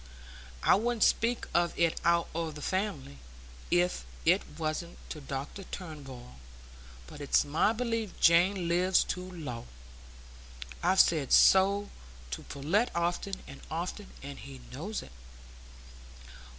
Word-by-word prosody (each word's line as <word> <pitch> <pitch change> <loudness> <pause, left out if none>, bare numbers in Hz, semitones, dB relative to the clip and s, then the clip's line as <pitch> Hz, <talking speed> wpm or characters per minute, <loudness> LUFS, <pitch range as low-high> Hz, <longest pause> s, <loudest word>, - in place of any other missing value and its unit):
I - - +6
wouldn't 230 +2 +2
speak 235 +1 +2
of 170 0 +1
it 170 -1 +1
out 170 0 +3
o' 165 0 -2
the 150 -1 -8
family, 185 - -2 0.5
if 175 +1 +2 0.2
it 180 +4 +5 0.2
wasn't 160 +2 -3
to 155 - -6
Dr 140 +7 -5
Turnbull; 135 - -9 0.7
but 105 - -11
it's 145 - +3
my 155 +8 +2
belief 230 -3 -2
Jane 175 +2 +4
lives 180 +2 +3
too 180 0 -4
low. 135 -10 -6 1.1
I've 185 +2 +6
said 155 -5 +1
so 200 +2 +5 0.4
to - - -4
Pullet 170 - 0
often 175 +3 -1
and 140 - -11
often, 180 +5 -4
and 140 0 -7
he 135 -2 -10
knows 190 +11 -4
it." - - -13
170 Hz, 125 wpm, -30 LUFS, 150-195 Hz, 1.1 s, I